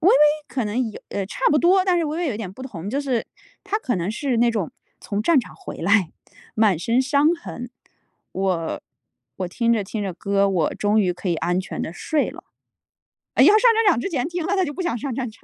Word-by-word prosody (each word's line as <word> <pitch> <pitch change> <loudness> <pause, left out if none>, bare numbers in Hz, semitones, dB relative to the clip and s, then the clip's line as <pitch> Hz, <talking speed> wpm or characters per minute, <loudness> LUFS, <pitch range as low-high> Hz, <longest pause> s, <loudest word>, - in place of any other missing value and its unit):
微 350 - +4
微 - - +7 0.3
可 240 -1 -2
能 225 +2 -1
有 - - -10
呃， 195 -1 -2
差 - - -9
不 300 - +4
多， 370 +3 +4
但 360 -2 +3
是 330 - +1
微 310 +2 -3
微 345 -4 0
有 225 - -2
点 200 -4 -6
不 255 +7 -11
同， 200 -8 -7
就 275 - -1
是， 260 -5 -1 0.4
它 410 +2 -1
可 245 - -1
能 175 +3 -2
是 260 +2 -1
那 240 0 +4
种 210 -8 -2 0.3
从 205 0 -3
战 320 +5 +4
场 190 - -12
回 - - -9
来， 190 -2 +3 0.4
满 210 -6 +3
身 230 +7 +1
伤 285 +3 +3
痕， 245 -8 -8 0.6
我 185 -4 -1 0.6
我 185 -2 -3
听 235 +5 +1
着 220 -3 +1
听 210 +2 -4
着 195 -2 -3
歌， 200 +2 +1
我 175 -5 0
终 210 +1 +2
于 180 -3 +1
可 180 +1 -5
以 170 - +2
安 175 +3 0
全 - - -6
地 160 - -4
睡 300 - -1
了。 - - -12 0.9
要 - - +7
上 425 +2 +7 0.2
战 450 0 +2
场 295 - +3
之 250 - -2
前 265 -7 -1
听 345 -2 -3
了 395 - 0
它 380 - +2
就 290 -4 -3
不 370 - -4
想 345 -9 -1
上 265 +3 -4
战 250 -3 -2
场。 215 - -18
230 Hz, 255 characters per minute, -22 LUFS, 195-295 Hz, 0.9 s, 微